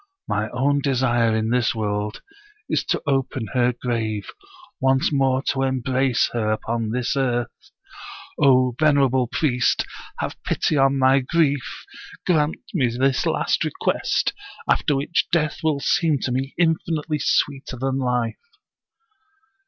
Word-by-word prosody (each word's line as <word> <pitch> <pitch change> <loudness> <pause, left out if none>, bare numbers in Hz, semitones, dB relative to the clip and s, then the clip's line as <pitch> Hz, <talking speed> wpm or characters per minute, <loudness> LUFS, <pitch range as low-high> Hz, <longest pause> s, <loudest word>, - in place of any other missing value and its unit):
My 110 +1 -1
own 140 +3 +1
desire 120 -4 +2
in 110 +1 0
this 120 -2 +1
world 105 -1 -3 0.4
is - - 0
to - - -1
open 135 -4 -1
her 125 -1 +3
grave, 115 -4 -3 0.5
once 130 +1 +2
more 135 -1 +2
to 135 - 0
embrace 130 -1 +1
her 110 -3 0
upon 115 +1 -2
this 125 +4 -1
earth. 120 -3 0 0.9
O 130 -3 +4
venerable 135 -5 +3
priest, 125 -2 +1 0.3
have - - -5
pity - - 0
on 135 0 +3
my 135 +1 +4
grief! 145 -1 -1 0.4
Grant 155 -3 +2 0.2
me 140 -9 +2
this 130 +2 +1
last - - +1
request, - - 0 0.3
after 145 - +2
which 140 +5 0
death 155 -3 +1
will 155 -3 +1
seem 160 0 +2
to 130 - -2
me 135 +2 -2
infinitely 160 -2 0
sweeter 135 -1 0
than 135 +2 -1
life.' 125 - -3
130 Hz, 130 wpm, -22 LUFS, 120-140 Hz, 0.9 s, O